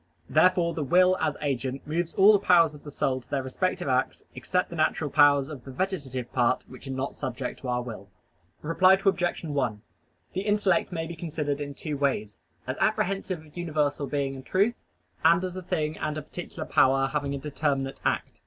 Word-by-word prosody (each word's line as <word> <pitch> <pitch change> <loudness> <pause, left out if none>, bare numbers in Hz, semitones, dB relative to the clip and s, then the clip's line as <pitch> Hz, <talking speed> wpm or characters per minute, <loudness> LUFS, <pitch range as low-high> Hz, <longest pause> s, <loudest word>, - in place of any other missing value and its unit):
Therefore 170 +1 +4
the 155 - -2
will 180 +6 +4
as 155 -2 0
agent 135 -1 -2
moves 165 +2 -2
all 205 +3 +7
the 205 - +4
powers 170 -5 +5
of 150 - -13
the 150 - -8
soul 130 -2 -1
to - - -24
their 135 -2 -1
respective 180 +6 -2
acts, 130 0 0
except 180 0 -1
the - - -5
natural 155 -2 0
powers 145 -2 +5
of 145 -5 -8
the - - -11
vegetative 135 -6 -3
part, 120 -2 +2
which 130 +2 -12
are - - -4
not 130 +1 -3
subject 130 -2 -4
to 130 - -7
our 125 0 0
will. 105 -5 -8 0.5
Reply 185 +4 +5
Obj. 190 -3 0
1: 135 -9 -2 0.5
The 190 - -1
intellect 205 -4 +1
may 165 -2 -3
be 170 +1 -7
considered 150 -3 -3
in 140 -1 -5
two 150 -1 -4
ways: 120 -7 -1 0.3
as - - -4
apprehensive 185 -3 0
of 150 - -20
universal 150 -4 -1
being 140 -1 -1
and 135 -1 -9
truth, 205 - +1 0.4
and 170 +3 +5
as 185 -1 -4
a 185 - -5
thing 160 -4 -2
and 155 0 -2
a 155 - -4
particular 175 +3 -7
power 135 +1 +4
having 140 0 -2
a - - -3
determinate 135 -1 -2
act. - - -1
150 Hz, 200 wpm, -27 LUFS, 135-175 Hz, 0.5 s, all